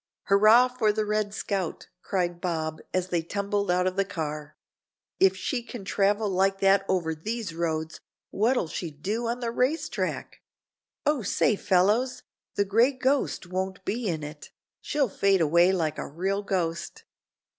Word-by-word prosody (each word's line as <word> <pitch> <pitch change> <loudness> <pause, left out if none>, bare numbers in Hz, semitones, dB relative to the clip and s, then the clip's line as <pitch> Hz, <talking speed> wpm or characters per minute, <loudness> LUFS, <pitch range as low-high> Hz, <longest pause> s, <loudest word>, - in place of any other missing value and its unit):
"Hurrah 215 +5 +6
for 245 -4 +1
the 215 0 -1
'Red 210 -1 0
Scout,'" 195 -4 -3
cried 175 -2 -2
Bob, 160 -3 -2
as 185 0 -1
they 175 -2 +1
tumbled 200 +3 -2
out 180 +1 +2
of 185 +1 -1
the 195 - +3
car. 155 -5 -5 0.6
"If 190 0 +4
she 240 +7 -2
can 235 -4 -9
travel 205 +2 +1
like 195 0 +1
that 195 0 +4
over 170 -4 +1
these 210 +4 -4
roads, 160 -1 -2 0.3
what'll 225 -2 +1
she 165 +2 -4
do 200 +11 -3
on 240 +2 -2
the 235 -1 -2
race 290 +6 0
track? - - -4 0.6
Oh, 295 -3 +2
say, 210 +2 +2
fellows, 205 +8 +2 0.3
the 200 - +2
'Gray 230 +7 +3
Ghost' 260 -4 0
won't 190 +1 -4
be 230 +1 -2
in 160 -4 -2
it. 150 0 -9 0.3
She'll 290 -3 0
fade 195 -2 +2
away 170 +3 +4
like 165 -5 -1
a - - -4
real 190 +7 -2
ghost." 170 -4 -3
195 Hz, 160 wpm, -27 LUFS, 175-220 Hz, 0.6 s, Hurrah